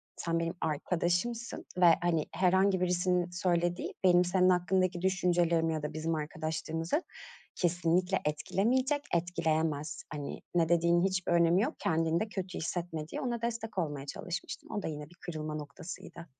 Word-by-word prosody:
sen 165 0 -1
benim 165 0 -1
arkadaşımsın 175 +9 -1
ve 180 - +5 0.2
hani, 170 -3 +1
herhangi 190 +1 +3
birisinin 180 0 +1
söylediği, 175 -1 0
benim 180 -1 +6
senin 185 +1 +3
hakkındaki 180 0 +2
düşüncelerimi 175 -3 +2
ya 155 -1 -3
da 150 - -3
bizim 160 +1 -1
arkadaşlığımızı, 160 - -2 0.5
kesinlikle 175 +2 +1
etkilemeyecek, 250 - +1
etkileyemez. 160 -3 0
Hani, 145 -1 -5
ne 165 -2 +3
dediğinin 170 +1 +4
hiçbir 190 -2 0
önemi 170 +2 +4
yok. 290 +8 -1
Kendini 165 -3 +1
de 220 - -2
kötü 190 -3 -4
hissetme.” 160 -2 -3
diye - - -5
ona 240 -2 -2
destek 230 -2 -3
olmaya 145 -6 -2
çalışmıştım. 175 +4 -6
O 205 - -2
da - - -4
yine 150 -1 -6
bir 175 - -18
kırılma 155 -4 -5
noktasıydı. 150 +3 -8
175 Hz, 145 wpm, -31 LUFS, 160-185 Hz, 0.5 s, benim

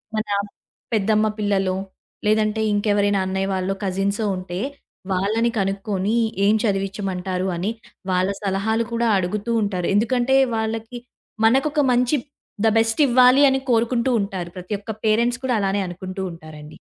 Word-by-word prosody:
మన 215 0 -1 0.7
పెద్దమ్మ 215 +1 +2
పిల్లలో 195 -3 +1 0.5
లేదంటే 215 0 +2
ఇంకెవరైనా 205 -1 +2
అన్నయ్య 190 +1 -1
వాళ్లో, 190 +1 -1
కజిన్సో 200 +3 -1
ఉంటే 185 0 -5 0.5
వాళ్ళని 215 +5 +1
కనుక్కొని 195 +1 -1 0.3
ఏం 210 - +5
చదివించమంటారు 195 -2 -2
అని 190 +6 -1 0.4
వాళ్ళ 185 +1 +2
సలహాలు 220 +4 0
కూడా 235 0 +1
అడుగుతూ 200 +5 -2
ఉంటారు. 185 -4 -2
ఎందుకంటే 245 +4 +2 0.2
వాళ్ళకి 225 +2 -3 0.5
మనకొక 270 +6 +3
మంచి 250 +4 +2 0.5
ధ - - +6
బెస్ట్ 225 +4 +2
ఇవ్వాలి 255 +2 +6
అని 265 0 +1
కోరుకుంటూ 235 +2 +2
ఉంటారు. 190 -3 -4
ప్రతొక్క 200 +4 -5
పేరెంట్స్ 235 +4 +2
కూడా 255 -1 0
అలానే 195 0 0
అనుకుంటూ 185 +2 -6
ఉంటారండి. 155 -2 -11
205 Hz, 125 wpm, -22 LUFS, 190-225 Hz, 0.7 s, ధ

